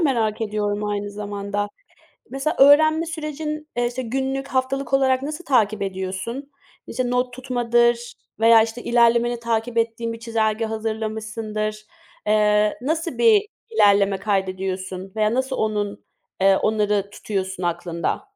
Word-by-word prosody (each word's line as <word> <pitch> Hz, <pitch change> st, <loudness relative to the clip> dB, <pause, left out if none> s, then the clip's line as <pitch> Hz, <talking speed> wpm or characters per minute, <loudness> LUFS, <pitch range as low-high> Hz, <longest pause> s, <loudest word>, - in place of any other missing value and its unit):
merak 225 Hz, -6 st, +1 dB
ediyorum, 210 Hz, -1 st, -1 dB
aynı 205 Hz, 0 st, -2 dB
zamanda. 205 Hz, 0 st, -3 dB, 0.6 s
Mesela, 290 Hz, +5 st, -2 dB
öğrenme 310 Hz, +4 st, +6 dB
sürecin, 305 Hz, -1 st, -5 dB
eee, 240 Hz, -, +1 dB
işte, 245 Hz, +2 st, -3 dB
günlük, 270 Hz, +3 st, -2 dB
haftalık 265 Hz, +1 st, -1 dB
olarak 265 Hz, -1 st, +3 dB
nasıl 305 Hz, +5 st, -5 dB
takip 215 Hz, -7 st, +2 dB
ediyorsun? 190 Hz, +8 st, -4 dB, 0.4 s
İşte, 255 Hz, -1 st, -2 dB
not 250 Hz, 0 st, 0 dB
tutmadır 240 Hz, -1 st, +1 dB, 0.3 s
veya, 225 Hz, 0 st, +7 dB
işte, 225 Hz, +2 st, -4 dB
ilerlemeni 235 Hz, 0 st, +3 dB
takip 230 Hz, 0 st, -1 dB
ettiğin 230 Hz, 0 st, -1 dB
bir 230 Hz, -, -8 dB
çizelge 225 Hz, -1 st, 0 dB
hazırlamışsındır. 215 Hz, -1 st, -3 dB, 0.4 s
Eee, 210 Hz, 0 st, +3 dB
nasıl 325 Hz, +4 st, -2 dB
bir 435 Hz, -3 st, +5 dB, 0.2 s
ilerleme 200 Hz, -, +4 dB
kaydediyorsun 190 Hz, -1 st, -3 dB
veya 215 Hz, +1 st, +2 dB
nasıl 260 Hz, +1 st, -1 dB
onun, 210 Hz, -2 st, -2 dB, 0.4 s
eee, 195 Hz, 0 st, +5 dB
onları 210 Hz, -2 st, +1 dB
tutuyorsun 190 Hz, -3 st, -4 dB
aklında? 170 Hz, -, -2 dB
225 Hz, 125 wpm, -22 LUFS, 205-260 Hz, 0.6 s, veya